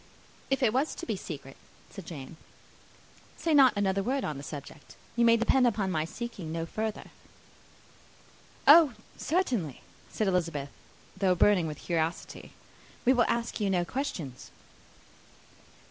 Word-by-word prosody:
"If 270 0 +1
it 225 -3 +3
was 270 +5 0
to - - -7
be 225 - -1
a - - -4
secret," 145 -7 -8 0.3
said 195 -4 -10
Jane, 150 -1 -8 1.0
"say 330 - 0
not 270 -5 +7
another 195 -1 +1
word 260 +6 -1
on 150 -2 -3
the - - -7
subject. 145 0 -9 0.2
You 235 - +3
may 230 0 +6
depend 245 +2 +3
upon 205 -5 0
my 155 -2 0
seeking 195 -3 -6
no 165 0 -2
further." 215 +5 -4 1.5
"Oh, 300 -3 +8 0.2
certainly," 245 - -1 0.3
said 215 - -1
Elizabeth, 165 -6 -1 0.5
though 190 -1 +2
burning 180 -2 +4
with 150 -1 -5
curiosity; 165 0 -3 0.5
"we 255 - +6
will 240 -3 +3
ask 235 0 -1
you 205 -2 0
no 180 -2 +1
questions." 175 - -5
195 Hz, 145 wpm, -29 LUFS, 165-240 Hz, 1.5 s, Oh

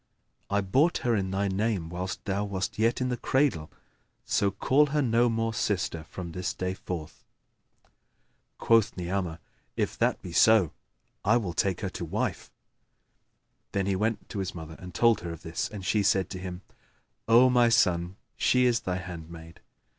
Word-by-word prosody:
I 100 0 +1
bought 135 - +2
her 120 -2 +3
in 95 -2 -1
thy 100 +1 0
name 100 -3 -1
whilst 90 +2 -5
thou 100 0 -1
wast 100 0 -3
yet 115 +3 +2
in 125 - 0
the 125 - -1
cradle; 130 - 0 0.5
so 100 - +2
call 145 +8 +3
her 150 +1 0
no 120 0 +3
more 115 0 -1
sister 90 -7 -1
from 85 0 -7
this 90 +1 -3
day 90 0 -2
forth." 85 -4 -7 1.3
Quoth 115 -3 +3
Ni'amah, 90 -2 -2 0.4
"If - - -2
that - - +2
be 90 - -7
so, 100 -2 +5 0.5
I 105 +4 +4
will 100 -7 -3
take 95 0 0
her - - -2
to - - -6
wife." - - -3 1.2
Then 100 -1 0
he 100 -1 0
went 110 +3 -1
to 100 - -4
his 95 -1 -3
mother 80 -1 -8
and 90 -1 -9
told 115 -2 +4
her 85 - -5
of 85 - -11
this, 80 0 -3
and 100 -3 -8
she 105 - +2
said 100 -3 +2
to 95 - -5
him, 90 0 -7 0.6
"O 120 +3 +7
my 120 -1 +5
son, 90 -5 +2 0.2
she 125 0 +3
is 120 -1 +3
thy 90 - -3
handmaid." 85 -2 -9
95 Hz, 175 wpm, -28 LUFS, 90-115 Hz, 1.3 s, O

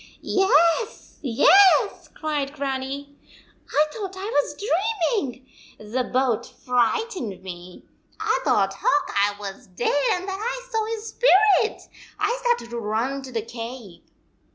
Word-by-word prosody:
"Yes, 385 +2 +2
yes," 360 - +5
cried 295 -3 -2
Grannie. 275 0 -4 0.5
"1 - - -35 0.2
thought 385 +1 -6
I 400 +4 -4
was 290 -3 0
dreaming! 365 - -1 0.3
The 235 +4 -3
boat 245 -3 0
frightened 245 - -1
me. 180 -1 -10 0.3
I - - +1
thought - - +2
Hawk 385 -6 +1
Eye 200 0 +2
was 195 -1 -8
dead 190 +6 -1 0.2
and 365 +1 -4
that 385 0 -4
I - - -4
saw 445 -1 +1
his 445 -1 -4
spirit. 430 -2 +4 0.3
I 420 +4 +1
started 480 - 0
to 235 - -3
run 230 +6 -2
to 265 -1 -9
the 225 -3 -2
cave." 230 -4 -8
280 Hz, 130 wpm, -24 LUFS, -, 0.5 s, yes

